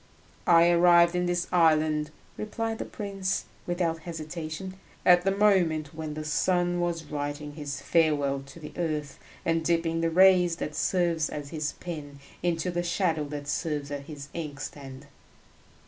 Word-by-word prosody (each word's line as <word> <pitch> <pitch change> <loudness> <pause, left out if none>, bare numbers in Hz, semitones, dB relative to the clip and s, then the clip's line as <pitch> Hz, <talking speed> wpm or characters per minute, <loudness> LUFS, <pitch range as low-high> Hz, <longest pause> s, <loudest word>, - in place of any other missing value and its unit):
"I 170 0 +6
arrived 170 0 +6
in 180 0 +1
this 175 0 0
island," 155 -3 +3 0.3
replied 225 +1 -3
the - - -3
prince 195 -3 -3 0.2
without 175 -2 0
hesitation, 160 +2 -6 0.3
"at 175 0 +6
the - - +4
moment 180 -7 +2
when 155 -1 -5
the 155 0 -5
sun 175 +3 +1
was 170 -1 -1
writing 145 0 -4
his 145 -1 -5
farewell 145 -4 +2
to 140 - -12
the 150 - -9
earth 155 -4 -3 0.3
and 165 0 +1
dipping 165 0 +1
the 165 - +2
rays 180 0 +5
that 150 - -4
serves 170 -4 +1
as 145 -1 -6
his 155 -1 -3
pen 150 -5 -7 0.2
into 175 +1 0
the 175 0 -1
shadow 170 -3 0
that 145 0 -6
serves 145 -1 -2
as 140 0 -5
his 145 -2 -8
inkstand." 145 -3 -7
165 Hz, 150 wpm, -28 LUFS, 150-175 Hz, 0.3 s, I